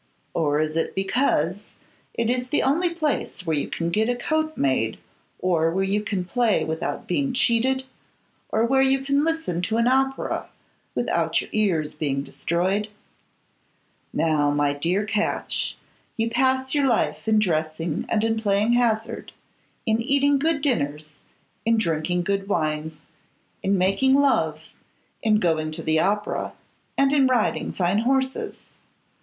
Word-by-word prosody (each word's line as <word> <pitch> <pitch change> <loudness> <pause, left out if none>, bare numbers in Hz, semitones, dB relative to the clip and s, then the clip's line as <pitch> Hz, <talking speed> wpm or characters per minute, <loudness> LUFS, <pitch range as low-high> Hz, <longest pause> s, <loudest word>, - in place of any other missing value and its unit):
Or 150 -3 +1
is 155 0 -1
it 165 - -1
because 195 - 0 0.5
it 230 - 0
is 250 +1 -1
the 295 - +1
only 330 +7 +2
place 310 - -2
where 160 -2 +1
you 145 - -1
can 170 0 -3
get 220 +5 +1
a 245 - +1
coat 315 +5 -1
made, 130 -5 +1 0.4
or 165 -3 +1
where 190 +3 0
you 200 +2 0
can 200 -3 -2
play 220 -5 +1
without 160 +1 -3
being 265 +8 0
cheated, 255 +2 +2 0.7
or 220 +1 +2
where 265 +2 +3
you 270 0 +3
can 280 +1 +2
listen 325 - -1
to 220 +5 -1
an 230 - +3
opera 270 +1 0 0.5
without - - +1
your - - -7
ears 175 -8 +1
being 140 -3 -2
destroyed? 185 +8 -1 1.2
Now, 155 -3 +2
my 145 0 +1
dear 175 +8 0
Catch, 215 0 -1 0.4
you 225 0 0
pass 260 +2 +1
your 285 -2 +3
life 230 -2 0
in 220 -1 +4
dressing 160 -4 -1
and 215 - +1
in 225 0 +1
playing 205 +1 +2
hazard, 230 -2 0 0.5
in 220 -1 +1
eating 280 +3 +3
good 305 -1 0
dinners, 150 - -1 0.4
in 230 0 +2
drinking 175 -2 0
good 195 +1 -1
wines, 155 -3 -1 0.7
in 195 0 +1
making 195 +9 +3
love, 280 -1 +2 0.6
in 220 -2 +3
going 160 -5 +1
to - - -4
the 160 0 +2
opera, 205 +4 -1 0.4
and 275 0 +3
in 275 -3 +4
riding 250 -4 +1
fine 180 +2 +1
horses. 265 +2 -1
210 Hz, 150 wpm, -24 LUFS, 165-260 Hz, 1.2 s, in